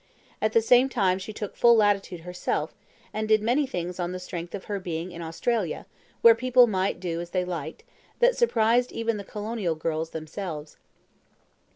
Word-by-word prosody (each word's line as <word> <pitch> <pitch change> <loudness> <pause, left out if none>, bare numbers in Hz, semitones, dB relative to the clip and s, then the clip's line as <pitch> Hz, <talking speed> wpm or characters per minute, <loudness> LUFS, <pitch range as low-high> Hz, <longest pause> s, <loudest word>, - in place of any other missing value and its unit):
At 215 0 +1
the 230 - +4
same 250 +3 +5
time 190 -7 +1
she 195 +3 -7
took 210 -1 -6
full 235 0 +6
latitude 200 -5 +1
herself, 180 +1 -3 0.4
and 215 0 -2
did 215 -1 +3
many 260 +6 +2
things 180 -6 -4
on 175 0 -2
the 185 - -4
strength 175 -1 -6
of 195 - -7
her 205 -1 -3
being 175 -1 -4
in 170 0 -8
Australia, 170 +4 -2 0.4
where 230 - +10
people 250 +1 +5
might 190 -5 -1
do 170 -2 -3
as 170 - -7
they 180 0 -1
liked, 165 -3 -5 0.3
that - - +4
surprised 245 - +2
even 230 -1 -1
the 200 - -6
colonial 210 -4 -3
girls 160 0 -2
themselves. 160 -1 -6
195 Hz, 180 wpm, -26 LUFS, 175-230 Hz, 0.4 s, where